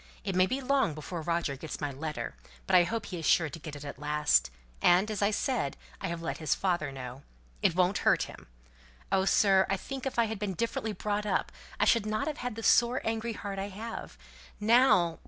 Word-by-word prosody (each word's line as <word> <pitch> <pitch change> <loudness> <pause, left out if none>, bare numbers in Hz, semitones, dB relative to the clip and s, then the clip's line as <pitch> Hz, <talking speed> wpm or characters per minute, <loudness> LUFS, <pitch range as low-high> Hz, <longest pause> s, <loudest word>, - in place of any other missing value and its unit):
It 195 - -2
may 185 0 +4
be 265 +5 -2
long 265 - +1
before 160 +3 -5
Roger 170 -3 -1
gets 150 +3 -7
my 145 -2 -2
letter, 150 +3 -5 0.3
but 190 - +2
I 175 -1 +7
hope 225 +5 -3
he 180 -3 -5
is 160 - -5
sure 160 -4 +3
to 165 - -8
get 155 -2 -8
it 145 0 -8
at 140 - -7
last, 150 - +2 0.3
and, 185 +5 +4
as 210 - -3
I 200 - +4
said, 215 - -1 0.2
I - - -2
have 170 0 -4
let 165 - -3
his 155 - +1
father 175 -6 0
know; 130 0 -8 0.4
it 170 - +3
won't 185 +2 +2
hurt - - +3
him! - - -10 0.6
Oh, 190 0 +3
sir, 195 -1 +4
I 195 - +1
think 270 +6 -5
if 265 - -5
I 235 - +4
had 220 -2 -4
been 200 -3 -2
differently 225 +1 -2
brought 210 +2 -2
up 190 - 0 0.3
I - - +4
shouldn't 215 -2 +2
have 305 -1 -3
had 250 -3 -4
the 225 - -6
sore 240 +3 +4
angry 225 +1 -2
heart 200 -2 -5
I 195 +1 -3
have. 220 +4 -7 0.4
Now! 210 -7 +4
190 Hz, 220 wpm, -30 LUFS, 160-220 Hz, 0.6 s, I